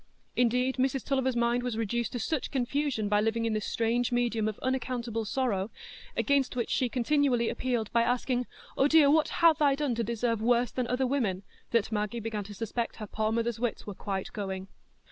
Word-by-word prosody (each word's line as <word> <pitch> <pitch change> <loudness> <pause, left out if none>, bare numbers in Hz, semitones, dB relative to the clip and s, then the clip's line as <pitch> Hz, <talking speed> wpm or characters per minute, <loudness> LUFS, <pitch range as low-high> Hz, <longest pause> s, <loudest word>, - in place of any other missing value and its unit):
Indeed, 250 +2 +2
Mrs 265 0 0
Tulliver's 265 -2 +1
mind 235 +1 +2
was 245 -3 -3
reduced 235 +2 -1
to 245 - -2
such 305 +3 -1
confusion 265 -3 -1
by 205 0 +3
living 225 +1 0
in 225 - 0
this 215 -1 -2
strange 235 +2 0
medium 235 -3 +1
of 215 - -3
unaccountable 245 -3 -2
sorrow, 215 -5 -1 0.5
against 280 -3 +2
which 240 -2 -2
she 255 -2 +1
continually 250 -1 +2
appealed 240 -4 -2
by 235 - +3
asking, 245 +1 0 0.3
"Oh 270 - +4
dear, 295 -2 +6
what 315 0 +4 0.2
have 320 -2 +6
I 280 -2 +5
done 285 -3 0
to 230 0 -1
deserve 230 0 -1
worse 240 0 +2
than 250 -2 -2
other 250 +2 +1
women?" 230 -8 0 0.3
that 230 -1 +1
Maggie 210 +2 -1
began 220 -2 -3
to 205 0 -9
suspect 230 +3 -3
her 215 - -6
poor 215 +1 -1
mother's 230 0 -1
wits 240 -2 -2
were 205 - -5
quite 195 0 -4
going. 190 -2 -4
235 Hz, 195 wpm, -29 LUFS, 220-255 Hz, 0.5 s, dear